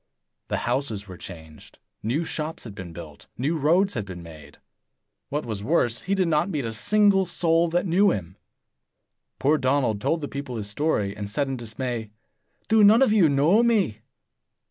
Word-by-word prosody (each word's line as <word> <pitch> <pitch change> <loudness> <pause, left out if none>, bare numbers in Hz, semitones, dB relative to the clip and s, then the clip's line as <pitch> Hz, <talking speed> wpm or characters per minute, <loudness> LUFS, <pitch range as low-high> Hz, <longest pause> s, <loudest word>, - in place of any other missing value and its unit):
The - - -1
houses 120 -5 -2
were 95 - -9
changed; 80 -4 -12 0.2
new 130 +10 -1
shops 160 0 -4
had 110 - -9
been 95 -3 -8
built; 80 -3 -11
new 145 +7 0
roads 170 +6 +2
had 110 - -2
been 90 -3 -9
made. 75 -3 -13 0.7
What 145 0 -2
was 105 -4 -5
worse, 120 -3 +1
he 195 +2 -1
did 185 -2 +1
not 165 +3 +1
meet 150 -8 -2
a 115 - -4
single 200 - +3
soul 170 -1 +2
that 175 +3 0
knew 195 +3 +4
him. 95 -2 -3 1.0
Poor 150 +3 +2
Donald 130 -6 +1
told 160 +5 0
the 145 - -3
people 140 -3 -6
his 105 -3 -4
story, 105 -4 -1
and 105 -1 -6
said 140 +6 -1
in 135 - -3
dismay, 120 -1 -5 0.6
"Do 220 -1 +4
none 220 +5 +7
of 215 - +3
you 190 -8 +5
know 150 +10 +4
me?" 210 - +1
140 Hz, 180 wpm, -25 LUFS, 105-170 Hz, 1.0 s, none